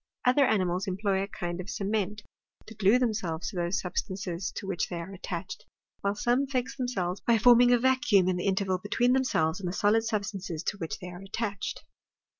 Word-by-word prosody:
Other 255 +2 +5
animals 185 -1 +1
employ 195 0 0
a 195 - -2
kind 175 -2 -4
of 185 - -9
cement 210 0 -2 0.4
to 220 - -10
glue 205 +2 +4
themselves 210 -9 -1
to - - -10
those 175 +1 0
substances 185 -1 -3
to 200 - -5
which 195 -3 -2
they 175 - -4
are 170 +4 -7
attached, 185 -1 -6 0.4
while 200 +1 -1
some 245 +6 +1
fix 255 -2 -2
themselves 200 -9 -2
by 235 -1 +3
forming 245 +1 +6
a 245 - +6
vacuum 240 -7 +3
in 185 - +2
the 180 - -2
interval 190 -1 +1
between 240 +6 +1
them 265 0 +3
selves 160 -8 0
and 185 -3 -3
the - - -4
solid 210 +3 +3
substances 200 -7 -3
to 200 - -2
which 165 -3 -4
they 180 -2 -8
are 175 +1 -9
attached. 200 0 -4
200 Hz, 200 wpm, -28 LUFS, 180-225 Hz, 0.4 s, forming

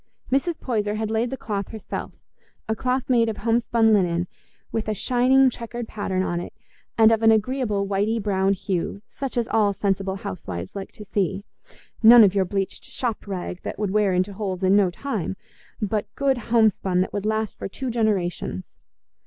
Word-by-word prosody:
Mrs. 310 +5 +1
Poyser 210 -4 -1
had 220 0 -2
laid 225 +2 +1
the 265 - -4
cloth 200 -5 -3
herself—a 220 0 -8
cloth 255 +2 -1
made 235 -3 +3
of 215 - -4
homespun 230 0 +2
linen, 175 -4 +2 0.5
with 225 -1 -2
a 215 - 0
shining 255 +5 +4
checkered 235 0 -6
pattern 190 -4 -2
on 175 -2 -1
it, 175 - -7 0.4
and 220 0 +7
of 225 -1 +2
an 225 - +6
agreeable 220 -2 +1
whitey 205 +3 0
brown 195 -2 +1
hue, 195 +1 -3
such 270 -3 -5
as 235 -1 +1
all 210 -2 +3
sensible 195 -1 -1
housewives 100 - -6
like 195 -1 -6
to 215 -3 -11
see—none 205 +4 +3
of 195 -3 +4
your 195 -2 +2
bleached 195 +1 -3
"shop 235 -5 -3
rag" 180 -2 -5
that - - -5
would 205 -2 -1
wear 210 -1 +2
into 185 +2 0
holes 190 -2 -4
in 190 +1 +4
no 200 -3 +4
time, 195 - -4 0.4
but 210 0 -1
good 270 -2 +1
homespun 210 -5 +3
that 185 - -2
would 205 0 -2
last 220 0 -1
for - - -3
two 255 +6 -4
generations. 190 - -1
210 Hz, 175 wpm, -24 LUFS, 195-230 Hz, 0.5 s, and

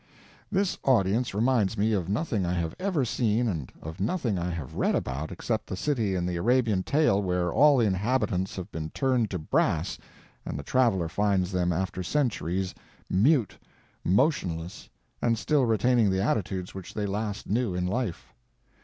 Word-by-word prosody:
This 195 -1 0
audience 115 -2 +2
reminds 110 -2 +2
me 110 +2 +2
of 95 -4 -1
nothing 110 - 0
I 90 0 0
have 85 -2 -2
ever 180 -8 0
seen 120 0 +1
and 80 - -3
of 80 +2 -7
nothing 110 - 0
I 85 +1 -2
have 80 -7 -5
read - - +1
about 70 +4 -3
except - - -3
the - - -4
city 110 -4 0
in 90 -1 -1
the 90 -1 -2
Arabian 115 0 +2
tale 140 -4 +2
where 90 -2 0
all 145 +3 +6
the 120 - +3
inhabitants 100 -1 0
have 95 -2 -6
been 80 -1 -4
turned 125 - +1
to 95 - -3
brass 80 - 0 0.4
and - - -5
the 70 - -5
traveler 115 - +2
finds 95 +1 +1
them 90 -1 +1
after 95 +1 -2
centuries 95 - -1 0.4
mute, 115 - +3 0.4
motionless, 90 - 0 0.3
and 115 -1 +2
still 140 +1 +2
retaining 115 0 +3
the 95 0 +1
attitudes 95 -4 -1
which 95 -2 -9
they 105 - -1
last 100 +1 -3
knew 110 -3 0
in 90 0 -1
life. 100 -1 -3
100 Hz, 170 wpm, -27 LUFS, 90-120 Hz, 0.4 s, all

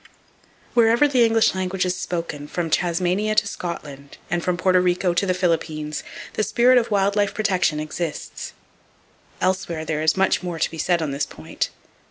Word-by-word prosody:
Wherever 235 +4 +5
the 255 -4 +3
English 225 -1 +4
language 185 0 -1
is 180 0 0
spoken, 165 -5 -4
from 165 0 -3
Tasmania 180 +6 +1
to - - +4
Scotland, 145 -5 -7
and 175 -1 0
from 180 -1 0
Porto 185 +1 +3
Rico 180 0 +1
to 175 - +1
the 185 - +1
Philippines, 155 -4 -1 0.3
the - - -1
spirit 245 +3 +4
of 235 - -3
wild 200 -1 +2
life 205 -1 +1
protection 185 -7 +1
exists. 155 +1 -5 0.9
Elsewhere 185 -4 -1
there 155 -1 -2
is 160 +3 +2
much 190 - +2
more 175 -2 -4
to - - 0
be 165 - -8
said 170 +1 +1
on 150 - -2
this 140 +1 -2
point. 80 0 -4
180 Hz, 175 wpm, -22 LUFS, 160-200 Hz, 0.9 s, Wherever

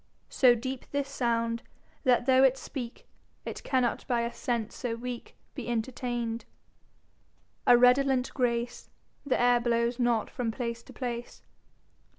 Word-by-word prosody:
So 250 -2 +5
deepe 260 +2 -5
this 280 -1 -1
Sound, 230 -3 0 0.4
that 250 -1 +4
though 260 0 +5
it 265 0 +5
speake, 250 -3 -7 0.4
It - - -5
cannot 255 -3 +1
by 240 -3 +1
a 235 0 -2
Sence 235 -3 -2
so 240 -3 -3
weake 245 +1 -7 0.2
Be 255 -4 -6
entertain'd. 235 0 -2 1.2
A 245 - +8
Redolent 250 +1 +4
Grace 240 -2 -1 0.4
The 260 - +2
Aire 245 0 +5
blowes 235 +1 +1
not 240 -3 +1
from 245 -3 -2
place 235 0 -3
to - - -15
place. 240 -2 -5
245 Hz, 140 wpm, -29 LUFS, 235-255 Hz, 1.2 s, A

